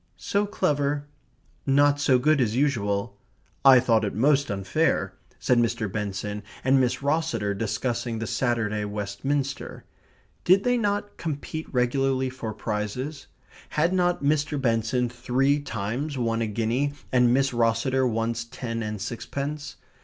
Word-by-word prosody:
"So 205 +1 0
clever" 145 -6 0 0.6
"not 145 +1 +3
so 135 -3 +4
good 150 +2 +3
as 110 -2 +1
usual" 105 -6 0 0.4
"I 135 -2 +9
thought 115 -3 +2
it 100 - -2
most 140 +5 +3
unfair," 100 0 0 0.2
said 125 -1 +2
Mr. 110 -3 0
Benson 105 0 -3 0.2
and 135 +1 +4
Miss 130 +2 0
Rosseter, 140 -9 0
discussing 115 +2 -2
the 115 - -3
Saturday 115 -3 0
Westminster. 110 +8 -3 0.6
Did 190 +2 +5
they 245 0 +2
not 205 -2 -1
compete 155 0 -5
regularly 130 +1 +1
for 120 -4 -5
prizes? 110 +7 -4 0.4
Had 165 +4 +1
not 175 -3 +1
Mr. 145 0 +1
Benson 120 0 +1
three 130 +4 +1
times 125 +4 -3
won 115 -2 0
a 115 - 0
guinea, 115 +7 0 0.2
and 125 -2 +4
Miss 135 +2 +2
Rosseter 120 +3 +2
once 115 0 -1
ten 115 -1 -5
and 105 -1 -4
sixpence? 140 +7 -5
125 Hz, 135 wpm, -25 LUFS, 110-145 Hz, 0.6 s, I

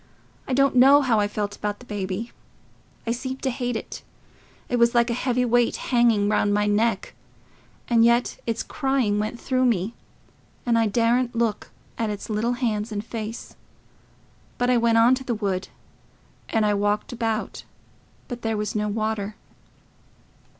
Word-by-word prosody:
I 265 - -1
don't 275 0 +3
know 275 +3 +7
how 235 -5 +2
I 205 - +2
felt 205 0 -3
about 210 0 -3
the 250 - -15
baby. 205 +1 -4 0.7
I 230 - -1
seemed 260 +2 -4
to 265 - +1
hate 245 -1 -3
it—it 245 +2 -8
was 235 +1 +4
like 235 0 +3
a - - +1
heavy 250 +1 0
weight 240 0 +2
hanging 235 -5 +2
round 205 -1 +2
my 210 0 +2
neck; 210 0 0 0.7
and 230 -1 +4
yet 235 +1 +2
its 230 -1 -1
crying 265 -7 0
went 215 +3 -3
through 255 -1 +1
me, 220 -2 +1 0.7
and 240 -2 +2
I 225 -1 +3
daredn't 235 +3 +1
look 230 -2 -1 0.3
at 225 -2 0
its 210 +1 -5
little 225 +3 0
hands 225 -3 -2
and 210 0 -4
face. 225 -1 -6 1.0
But 245 0 +1
I 250 - +4
went 230 -1 +3
on 230 +2 +6
to 260 0 -1
the 245 -2 -2
wood, 195 -3 -2 0.8
and 220 -1 +1
I 210 - +2
walked 205 +3 0
about, 225 -2 -3 0.6
but 245 -2 -6
there 225 -1 -1
was 210 0 -2
no 210 -1 -1
water...." 215 -1 -2
230 Hz, 165 wpm, -24 LUFS, 210-245 Hz, 1.0 s, know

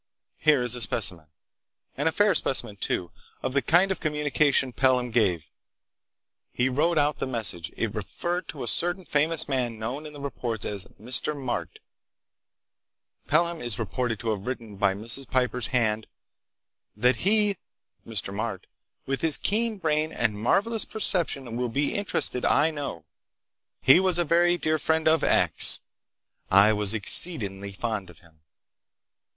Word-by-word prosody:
Here 150 -5 +3
is 125 -1 +3
a 125 - -2
specimen—and 90 - -3
a - - -4
fair 205 +3 +2
specimen, 130 - 0
too—of 95 +8 -2
the 140 - +2
kind 180 +6 +3
of 190 - -3
communication 150 -3 0
Pelham 125 -2 +1
gave. 90 -10 0 1.0
He 125 +1 0
wrote 155 +6 0
out 150 0 +1
the - - -3
message. 105 -9 -1
It 110 -2 -2
referred 175 - -4
to 135 -2 -7
a - - -5
certain 175 - +3
famous 155 +2 +1
man 125 -4 -2
known 130 +8 -5
in 150 - -11
the 145 - -10
reports 120 -6 -4
as 100 -2 -3
Mr. 130 +6 -1
Marte. 130 -3 -4 1.5
Pelham 170 +2 +1
is 120 -3 -1
reported 115 +2 -3
to 115 -2 -2
have 105 +1 -5
written 115 -5 -6
by 100 -1 +1
Mrs. 115 +6 0
Piper's 125 -3 0
hand: 110 -3 0 0.9
"That 125 +2 +2
he 205 0 +1 0.5
(Mr. 100 -3 -5
Marte), 105 -2 -5 0.4
with 135 0 -3
his 160 -3 +3
keen 220 +2 0
brain 155 -3 -1
and 115 -6 -1
marvelous 200 - +1
perception, 165 - 0
will 125 0 -2
be 140 +5 -1
interested, 200 -10 -1
I 155 +3 +2
know. 140 - -6 0.8
He 135 +8 +7
was 185 -2 +3
a 175 - 0
very 175 +2 +2
dear 155 -2 -1
friend 160 +1 0
of 160 +1 +3
X. - - +3 0.7
I 100 +3 +5
was 105 0 +2
exceedingly 100 - +3
fond 105 -2 -4
of 90 - -16
him. 80 -3 -24
130 Hz, 150 wpm, -25 LUFS, 110-160 Hz, 1.5 s, He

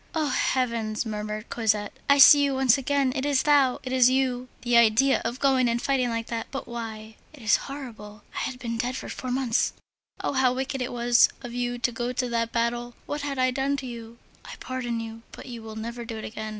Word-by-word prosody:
"Oh, 310 -2 +1
heavens!" 235 -4 0
murmured 215 0 -5
Cosette, 215 -3 0 0.2
"I 280 - +6
see 285 +1 +9
you 280 -1 +1
once 265 -3 +4
again! 275 -1 0
it 265 - -1
is 285 -2 +2
thou! 285 -4 +4
it 260 0 -4
is 255 -1 +6
you! 255 -1 0 0.2
The 240 -1 +1
idea 235 +4 +5
of 235 +3 -3
going 260 -3 +3
and 235 0 0
fighting 260 -2 +1
like 230 -1 -2
that! 230 -1 -4
But 270 - -6
why? 220 -2 -7 0.2
It 280 -6 -14
is 215 - +4
horrible. 220 -7 -9
I - - -2
have 260 - -8
been 230 -2 -4
dead 250 +2 -1
for - - -7
four 255 - -6
months. 250 -2 +1 0.5
Oh! - - -2
how 260 -2 +3
wicked 265 0 -3
it 250 - -3
was 240 0 +4
of 240 -1 -7
you 245 0 -2
to 245 +1 0
go 240 +2 -3
to 250 0 -1
that 230 -1 -1
battle! 240 +1 -1
What 290 0 -4
had 285 -1 -3
I 255 0 +2
done 275 +2 0
to 265 - -6
you? 235 -1 -8 0.3
I - - -9
pardon 245 -3 -3
you, 225 0 -7
but - - -11
you 240 -3 -8
will 220 -1 -9
never 235 +2 -5
do 225 -1 -6
it 220 - -6
again. 215 0 -6
245 Hz, 230 wpm, -26 LUFS, 230-265 Hz, 0.5 s, see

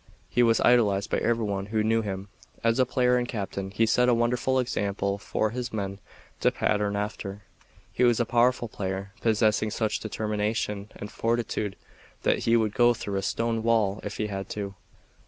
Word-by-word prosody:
He 125 - +2
was 115 -1 +4
idolized 105 -5 +3
by - - +2
every 115 -1 +1
one 100 -1 -2
who 110 0 0
knew 115 +1 +2
him. 100 -2 -5 0.4
As 115 +2 +2
a 130 - +4
player 125 -1 +3
and 120 0 -1
captain 100 -4 -4
he 105 +3 +2
set 125 +3 +3
a 120 - +4
wonderful 120 +3 +1
example 100 -5 -1
for 105 +1 -1
his 125 0 -4
men 100 -2 -4 0.4
to - - +4
pattern 105 -1 0
after. 105 -1 -4 0.5
He - - +1
was 120 -1 +4
a 120 - +2
powerful 120 +1 +2
player; 95 -2 -4
possessing 110 -1 +2
such 110 0 -1
determination 105 -1 -2
and 105 - -8
fortitude 115 -3 -1 0.5
that - - +2
he 115 0 +5
would 110 -2 0
go 120 0 +4
through 100 -3 -4
a - - 0
stone 115 +3 -1
wall 110 -3 +2
if 105 - -5
he 105 - -1
had 95 -2 -5
to. 100 -2 -4
110 Hz, 185 wpm, -27 LUFS, 100-115 Hz, 0.5 s, he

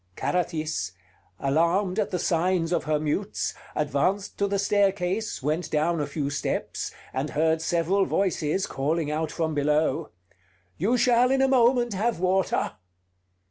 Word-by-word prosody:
Carathis, 155 - -2 0.5
alarmed 170 +8 +1
at 210 - 0
the 180 - -1
signs 175 0 +1
of - - 0
her 155 0 +1
mutes, 155 +7 -2 0.2
advanced 155 +7 0
to 200 - +2
the 200 0 0
staircase, 200 -2 0
went 155 +5 -1
down 155 +1 +1
a 145 - -2
few 145 -3 -3
steps, 140 - -3 0.2
and 135 +3 -2
heard 160 +2 +1
several 175 +4 +1
voices 185 -2 0
calling 150 +2 -1
out 155 +1 -1
from 160 -2 -1
below: 150 +2 +1 0.7
"You 220 +9 +1
shall 245 +1 +4
in 270 0 +3
a - - +4
moment 245 -2 +3
have 220 +1 0
water!" 185 +1 +1
170 Hz, 140 wpm, -26 LUFS, 155-200 Hz, 0.7 s, shall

